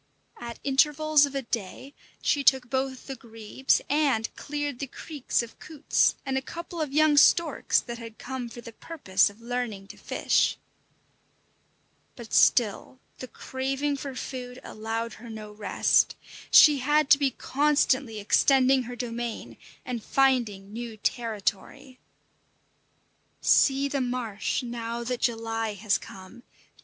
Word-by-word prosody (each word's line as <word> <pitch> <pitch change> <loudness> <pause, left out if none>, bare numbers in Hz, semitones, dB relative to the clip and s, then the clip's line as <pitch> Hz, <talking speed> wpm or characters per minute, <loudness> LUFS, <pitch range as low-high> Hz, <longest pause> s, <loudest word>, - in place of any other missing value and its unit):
At 235 -1 -7
intervals 295 +2 +3
of 280 - -10
a 275 - -2
day 230 +4 -5 0.3
she 285 - +1
took 260 -3 +3
both 265 -1 -2
the 270 - -6
grebes 225 +2 -1
and 275 -7 +1
cleared 290 -3 -4
the 275 - -4
creeks 280 -2 -3
of 230 - -12
coots 310 -2 +1
and 265 -1 0
a - - -10
couple 340 +4 -7
of 300 -3 -2
young 305 0 +4
storks 315 +1 +4
that 235 -1 -8
had 230 -1 -10
come 255 -2 -6
for 240 - -10
the 230 - -10
purpose 215 - 0
of 205 +3 -17
learning 235 -4 -4
to - - -11
fish. - - +1 1.6
But 235 -3 -11
still 240 +2 +3 0.2
the 255 - -7
craving 270 +3 -3
for 275 -1 -6
food 250 0 -6
allowed 225 +2 -4
her 235 - -10
no 215 -1 -8
rest. 210 0 +2 0.3
She 295 -3 +7
had 295 +2 +2
to 280 - +8
be 280 -2 +2
constantly 270 -4 +1
extending 265 +5 +4
her 245 - -6
domain 235 -1 -5 0.3
and 245 -3 -4
finding 230 -7 +1
new 230 -1 -6
territory. 230 +4 -3 1.4
See 275 0 +3
the 280 -1 -2
marsh 245 -4 -2
now 235 -1 -5
that 245 0 -3
July 225 -2 -1
has 205 +1 0
come! 190 +5 -12
250 Hz, 140 wpm, -26 LUFS, 230-275 Hz, 1.6 s, to